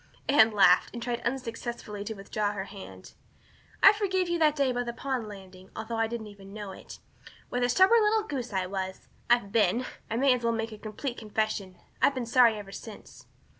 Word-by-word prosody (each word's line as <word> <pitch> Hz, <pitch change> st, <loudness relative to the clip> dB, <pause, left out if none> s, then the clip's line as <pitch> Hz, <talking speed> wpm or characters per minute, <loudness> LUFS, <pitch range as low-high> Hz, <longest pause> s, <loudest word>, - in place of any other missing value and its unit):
Anne 230 Hz, -5 st, +6 dB
laughed 195 Hz, -4 st, +5 dB
and 235 Hz, -, -5 dB
tried 240 Hz, -1 st, -2 dB
unsuccessfully 235 Hz, -4 st, -4 dB
to 220 Hz, +2 st, -5 dB
withdraw 205 Hz, +1 st, -2 dB
her 195 Hz, -2 st, -4 dB
hand. 195 Hz, 0 st, -11 dB, 0.7 s
"I 395 Hz, -, +10 dB
forgave 380 Hz, -4 st, 0 dB
you 345 Hz, 0 st, 0 dB
that 305 Hz, -2 st, +4 dB
day 275 Hz, -3 st, +2 dB
by 245 Hz, 0 st, -1 dB
the 240 Hz, -1 st, -4 dB
pond 260 Hz, -3 st, -3 dB
landing, 190 Hz, -2 st, -12 dB
although 225 Hz, +1 st, -4 dB
I 225 Hz, 0 st, +2 dB
didn't 220 Hz, -3 st, -7 dB
know 205 Hz, -2 st, -6 dB
it. -, -, -11 dB, 0.5 s
What 245 Hz, -, -2 dB
a 245 Hz, -, +2 dB
stubborn 380 Hz, -, +5 dB
little 430 Hz, +1 st, +3 dB
goose 265 Hz, -, -5 dB
I 190 Hz, -2 st, -1 dB
was. 190 Hz, 0 st, -5 dB, 0.2 s
I've 240 Hz, -4 st, +3 dB
been 225 Hz, +3 st, +2 dB, 0.2 s
I 225 Hz, -, -2 dB
may 265 Hz, +2 st, +4 dB
as 245 Hz, -1 st, -3 dB
well 230 Hz, 0 st, +2 dB
make 225 Hz, 0 st, -3 dB
a 215 Hz, -, -10 dB
complete 235 Hz, +4 st, -5 dB
confession 215 Hz, -3 st, -2 dB, 0.2 s
I've 275 Hz, -, +4 dB
been 255 Hz, -2 st, -2 dB
sorry 235 Hz, -1 st, +5 dB
ever 200 Hz, -2 st, -9 dB
since." 210 Hz, +1 st, -11 dB
230 Hz, 200 wpm, -28 LUFS, 205-255 Hz, 0.7 s, I